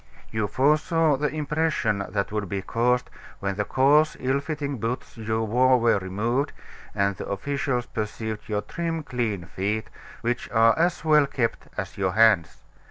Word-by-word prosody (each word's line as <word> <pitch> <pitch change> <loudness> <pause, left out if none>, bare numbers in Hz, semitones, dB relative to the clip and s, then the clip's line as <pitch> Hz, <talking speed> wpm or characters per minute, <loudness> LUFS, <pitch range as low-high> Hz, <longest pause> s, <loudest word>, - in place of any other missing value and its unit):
You 110 -2 0
foresaw 155 - +2
the 150 +2 0
impression 150 -8 0
that 100 +1 -2
would 105 -3 -2
be 95 0 -3
caused 125 +4 +1 0.3
when 100 0 -1
the 105 - 0
coarse, 150 +4 +3
ill 130 +2 +1
fitting 145 -3 -4
boots 115 +3 -4
you 110 -1 -2
wore 125 +3 +4
were 115 -3 +3
removed, 115 +9 -1 0.4
and 100 -1 +1
the - - -6
officials 125 +3 -1
perceived 110 0 -5
your 105 -1 0
trim, 165 -2 -3
clean 115 -10 -2
feet, 105 +5 -3 0.3
which 120 +1 -2
are 115 0 +5
as 170 0 0
well 150 -2 +5
kept 115 -4 -2
as - - -5
your 95 -2 +1
hands. 110 -7 +3
120 Hz, 160 wpm, -25 LUFS, 105-145 Hz, 0.4 s, are